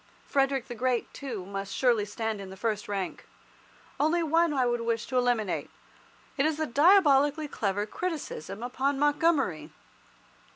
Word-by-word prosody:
Frederick 270 -2 +1
the 245 - -6
Great, 245 0 -1
too, 235 -10 -6
must 195 0 -5
surely 235 -5 +2
stand 215 0 -3
in 195 - -8
the 190 - -10
first 215 0 -2
rank. 195 -2 -4 0.7
Only 330 +3 +2
one 330 +2 +3
would 290 -3 -1 0.2
I - - -4
wish 230 0 -1
to 255 - -2
eliminate. 240 -5 0 0.7
It 275 - +2
is 315 -1 -1
the 315 - 0
diabolically 295 0 +4
clever 205 -6 -1
criticism 225 - -5
upon 265 +3 -1
Montgomery. 285 - +1
250 Hz, 150 wpm, -28 LUFS, 210-290 Hz, 0.7 s, diabolically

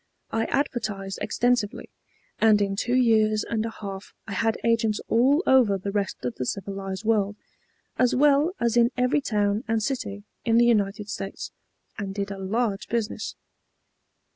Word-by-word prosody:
I 225 0 0
advertised 215 -8 -2
extensively, 240 -4 0 0.5
and 220 -2 +5
in 200 -1 0
two 240 +4 0
years 220 -4 +3
and 220 -2 -2
a - - -3
half 200 -3 -8
I 220 - -8
had 225 +3 +1
agents 225 -2 +2
all 270 +9 +4
over 245 -7 +4
the 200 +1 -4
rest 200 -9 -2
of 125 - -1
the 125 - -2
civilized 195 0 -4
world, 210 -2 +1 0.6
as 250 -1 +3
well 290 +5 +4
as 235 0 +1
in 235 0 +5
every 250 +4 +2
town 210 -2 0
and 225 -1 0
city 205 -6 -3 0.2
in 230 0 +3
the 240 - +6
United 210 -2 +1
States, 195 -2 -6 0.5
and 195 -1 -4
did 200 0 -3
a 195 - -6
large 205 +1 -1
business. 230 -2 -2
215 Hz, 160 wpm, -25 LUFS, 200-240 Hz, 0.6 s, the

